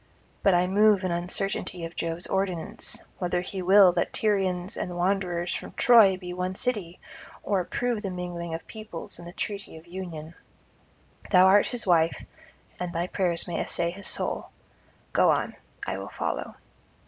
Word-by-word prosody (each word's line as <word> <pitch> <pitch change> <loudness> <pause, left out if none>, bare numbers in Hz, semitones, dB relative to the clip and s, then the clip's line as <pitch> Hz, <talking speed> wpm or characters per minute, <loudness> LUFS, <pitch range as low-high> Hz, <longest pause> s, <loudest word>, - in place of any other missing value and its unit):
But 195 -3 +4
I 175 +1 +3
move 205 +1 +4
in 185 - 0
uncertainty 175 0 -1
of 165 - -9
Jove's 165 +1 -2
ordinance, 190 -4 -2 0.2
whether 180 -1 0
he 185 +1 -5
will 190 0 +7
that 175 0 -1
Tyrians 190 -3 0
and 180 -1 -4
wanderers 180 -1 0
from - - -6
Troy 220 -6 +6
be 180 -1 -7
one 180 +1 -3
city, 200 -8 -2 0.4
or 200 -2 +1
approve 235 +5 -1
the 200 - -3
mingling 175 -2 -4
of 165 - -8
peoples 215 -7 -7
and 170 - -10
the - - -8
treaty 200 -2 -5
of 160 - -14
union. 170 -3 -7 1.0
Thou 185 -1 +7
art 200 +2 +6
his 245 -2 -2
wife, 165 -3 +2 0.5
and 180 -1 -3
thy 170 0 -1
prayers 180 -2 -1
may 175 - -2
essay 170 0 0
his 195 +2 -3
soul. - - +1 0.6
Go - - +5
on; - - +1 0.3
I - - -3
will - - -7
follow.' - - -4
180 Hz, 165 wpm, -27 LUFS, 175-195 Hz, 1.0 s, will